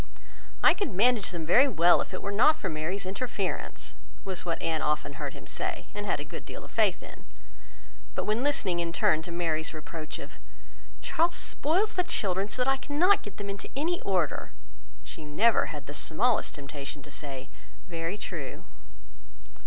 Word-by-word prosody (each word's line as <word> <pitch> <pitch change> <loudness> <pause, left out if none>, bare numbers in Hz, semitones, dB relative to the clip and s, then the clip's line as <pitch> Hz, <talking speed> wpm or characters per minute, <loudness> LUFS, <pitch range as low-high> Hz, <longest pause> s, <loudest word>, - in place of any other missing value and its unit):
"I - - +8
could 405 - -2
manage 215 +2 +4
them 170 -3 -4
very 245 - +6
well, 175 -8 +5
if - - -5
it 185 - -5
were 200 - -1
not 245 +10 +6
for 195 -11 -3
Mary's 165 +5 -2
interference," 190 - -3 0.3
was 190 -2 -4
what 170 -2 -1
Anne 160 -1 0
often 150 0 -1
heard - - -3
him - - -11
say, - - -3
and 205 0 -4
had 160 - +1
a 145 - -4
good 150 - -7
deal - - -8
of - - -13
faith - - +2
in; - - -12 0.9
but - - -1
when 215 +3 +1
listening 215 -11 +1
in 170 -1 -1
turn 155 -1 +3
to 170 - -8
Mary's 165 -2 -1
reproach 155 0 -6
of 140 - -10 0.6
"Charles 335 - +2
spoils 370 +9 +1
the 360 - +2
children 200 - 0
so 250 - 0
that 270 - +3
I 270 - +2
cannot 330 +9 +3
get 205 - -9
them 205 - -5
into 200 0 -5
any 330 +5 0
order," 180 -10 0 0.5
she 120 +5 -9
never 200 +10 +3
had 145 -2 -6
the 145 - -7
smallest 215 +11 +1
temptation 140 -1 -7
to 145 - -12
say, 135 -2 -6 0.4
"Very 165 +3 -3
true." 160 -9 -5
180 Hz, 185 wpm, -29 LUFS, 155-235 Hz, 0.9 s, I